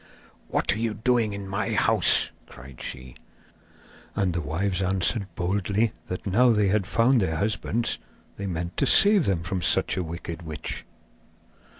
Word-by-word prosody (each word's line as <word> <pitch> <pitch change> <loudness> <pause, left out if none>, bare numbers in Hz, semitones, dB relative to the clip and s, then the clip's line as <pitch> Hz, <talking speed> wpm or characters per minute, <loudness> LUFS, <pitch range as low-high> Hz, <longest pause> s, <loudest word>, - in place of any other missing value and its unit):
'What - - 0
are 105 - -5
you 115 -2 -2
doing 115 -1 0
in 100 -1 -7
my 95 +1 -3
house?' - - +4 0.2
cried 65 +1 -13
she. 65 -1 -7 1.0
And 95 -3 0
the 85 - -2
wives 90 +5 -2
answered 95 +2 0
boldly 100 +5 -1 0.2
that 90 - -6
now 115 +6 +3
they 105 -2 +1
had 100 -1 0
found 115 +3 +2
their 80 -4 -1
husbands 110 +5 -2 0.4
they 100 - -6
meant 85 -1 -5
to 140 - +1
save 205 0 +7
them 90 -4 -1
from 90 +1 -3
such 85 - +3
a 90 - -1
wicked 85 0 -7
witch. 80 -2 -6
95 Hz, 160 wpm, -25 LUFS, 85-110 Hz, 1.0 s, save